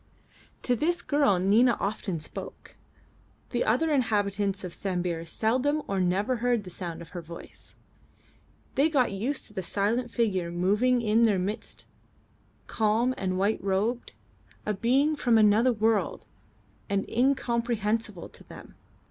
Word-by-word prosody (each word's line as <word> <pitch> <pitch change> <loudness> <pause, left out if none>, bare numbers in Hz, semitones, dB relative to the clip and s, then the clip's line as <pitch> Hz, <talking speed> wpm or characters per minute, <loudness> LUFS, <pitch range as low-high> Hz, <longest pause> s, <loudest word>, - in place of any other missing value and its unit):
To 245 - +2
this 345 +7 0
girl 285 -10 +3
Nina 220 +7 +4
often 200 -4 -2
spoke; 150 - -9 0.8
the - - +1
other 325 -9 +2
inhabitants 205 -6 0
of 180 -2 -6
Sambir 175 -3 -2
seldom 260 - 0
or 195 -1 -1
never 195 +7 +1
heard 240 -2 +1
the 180 - -10
sound 170 -2 -6
of 165 - -15
her 175 - -6
voice. 170 +1 -11 1.0
They 290 +3 +3
got 265 -8 +2
used 235 +9 -2
to - - -13
the 190 - -3
silent 215 +7 -1
figure 195 -8 0
moving 210 +8 +2
in 220 +1 +3
their 210 -4 +3
midst 200 +5 -4 0.8
calm 225 +3 +1
and 185 -4 -2
white 200 +2 0
robed, 205 +5 -1 0.5
a 210 - 0
being 265 +9 +2
from 240 -5 +3
another 220 +4 +5
world 220 -4 0 0.6
and 200 0 0
incomprehensible 235 -5 0
to - - -14
them. - - -13
215 Hz, 140 wpm, -27 LUFS, 195-245 Hz, 1.0 s, another